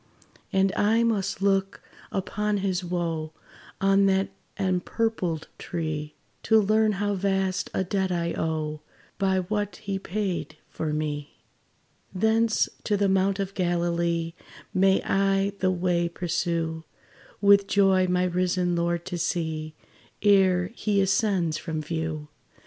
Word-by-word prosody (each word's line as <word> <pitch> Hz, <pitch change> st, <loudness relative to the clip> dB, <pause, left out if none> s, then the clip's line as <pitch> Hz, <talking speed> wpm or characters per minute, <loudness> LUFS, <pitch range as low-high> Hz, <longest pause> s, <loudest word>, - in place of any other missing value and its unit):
And 195 Hz, 0 st, +3 dB
I 220 Hz, +3 st, +3 dB
must 200 Hz, -4 st, 0 dB
look 195 Hz, -1 st, +1 dB, 0.3 s
upon 210 Hz, +2 st, -1 dB
his 185 Hz, -1 st, 0 dB
wo, 165 Hz, -3 st, -2 dB, 0.5 s
On 195 Hz, 0 st, +4 dB
that 190 Hz, 0 st, +2 dB, 0.3 s
empurpled 185 Hz, -2 st, -1 dB
tree, 155 Hz, -3 st, -4 dB, 0.3 s
To 220 Hz, -1 st, +4 dB
learn 215 Hz, +1 st, +3 dB
how 205 Hz, +1 st, -1 dB
vast 195 Hz, -1 st, 0 dB
a -, -, +1 dB
debt 190 Hz, 0 st, -1 dB
I 170 Hz, -1 st, -1 dB
owe, 155 Hz, -1 st, -2 dB, 0.4 s
By 190 Hz, -1 st, +2 dB
what 205 Hz, +2 st, -2 dB
he 200 Hz, -3 st, -4 dB
paid 190 Hz, -6 st, -3 dB
for 155 Hz, -1 st, -3 dB
me. 150 Hz, -1 st, -3 dB, 0.8 s
Thence 220 Hz, +3 st, +2 dB, 0.2 s
to 210 Hz, -, +1 dB
the 200 Hz, 0 st, +2 dB
mount 190 Hz, 0 st, +2 dB
of 195 Hz, -1 st, -3 dB
Galilee 170 Hz, -2 st, 0 dB, 0.4 s
May 190 Hz, +1 st, +3 dB
I 195 Hz, 0 st, +2 dB
the 185 Hz, -, +2 dB
way 175 Hz, -1 st, +1 dB
pursue, 170 Hz, -2 st, -2 dB, 0.6 s
With 200 Hz, 0 st, +5 dB
joy 190 Hz, -2 st, +4 dB
my 180 Hz, 0 st, +2 dB
risen 180 Hz, 0 st, +1 dB
Lord 170 Hz, 0 st, -1 dB
to 180 Hz, -2 st, -4 dB
see, 160 Hz, -2 st, -2 dB, 0.5 s
Ere 190 Hz, -3 st, +4 dB
he 210 Hz, -4 st, 0 dB
ascends 190 Hz, -5 st, +1 dB
from 160 Hz, -2 st, -4 dB
view. 155 Hz, -1 st, -3 dB
185 Hz, 125 wpm, -26 LUFS, 170-195 Hz, 0.8 s, With